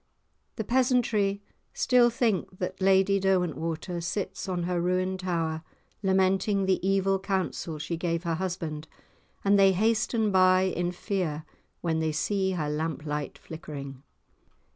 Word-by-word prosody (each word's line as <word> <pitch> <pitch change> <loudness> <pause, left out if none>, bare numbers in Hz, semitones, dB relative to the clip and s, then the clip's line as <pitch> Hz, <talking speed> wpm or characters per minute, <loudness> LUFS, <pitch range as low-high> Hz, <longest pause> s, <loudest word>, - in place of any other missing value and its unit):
The 220 - -3
peasantry 235 -5 +1 0.3
still 245 -2 +4
think 220 -6 -1
that 185 +1 -4
Lady 195 +1 +4
Derwentwater 175 -2 -1
sits 190 +2 -3
on 180 -2 -1
her 175 0 -1
ruined 185 +1 0
tower 165 -3 -1 0.4
lamenting 190 +1 +2
the 190 -1 +2
evil 195 0 +2
counsel 190 -4 -2
she 160 +3 -4
gave 170 0 -1
her 170 -2 -1
husband, 165 -3 -4 0.6
and 200 0 +5
they 195 -1 +6
hasten 220 +2 +1
by 185 -1 +5
in 175 -2 -1
fear 175 -5 -3 0.4
when 165 -2 0
they 160 -1 0
see 190 +5 0
her 155 -4 -2
lamp 155 +1 -3
light 150 -2 -3
flickering. 140 -4 -8
185 Hz, 135 wpm, -27 LUFS, 165-195 Hz, 0.6 s, they